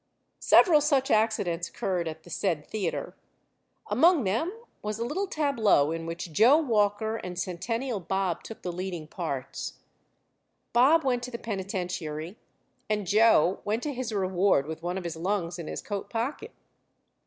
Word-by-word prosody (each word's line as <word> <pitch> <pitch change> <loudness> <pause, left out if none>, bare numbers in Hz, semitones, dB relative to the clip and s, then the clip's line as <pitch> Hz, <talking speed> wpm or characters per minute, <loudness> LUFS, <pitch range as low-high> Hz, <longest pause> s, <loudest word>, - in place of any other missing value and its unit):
Several 315 -6 +6
such 280 -3 +2
accidents 205 -6 +1
occurred 180 -3 -2
at 160 0 -6
the 175 - -14
said 160 -5 -1
theater. 195 -6 -3 0.7
Among 335 -4 +4
them 225 - 0 0.3
was 210 0 -3
a 230 - -2
little 380 +10 -2
tableau 230 - +2
in 165 0 -4
which 165 0 -6
Joe 240 - +6
Walker 220 -5 +1
and 180 -4 -7
Centennial 215 +7 -2
Bob 190 0 -1
took 225 - -10
the 180 - -2
leading 180 -2 -5
parts. 140 -6 -4 1.0
Bob 285 +7 +5
went 250 -2 +1
to 250 - -5
the 235 - -5
penitentiary, 180 -6 -4 0.5
and 210 -2 0
Joe 205 -3 +4
went 220 +3 -1
to 295 - -2
his 250 -2 -4
reward 190 -6 +2
with 160 +1 -6
one 175 +2 -3
of 190 - -4
his 170 -2 -4
lungs 180 -1 -2
in 165 - -6
his - - -5
coat 200 -2 -4
pocket. 265 - -3
200 Hz, 155 wpm, -28 LUFS, 175-235 Hz, 1.0 s, Several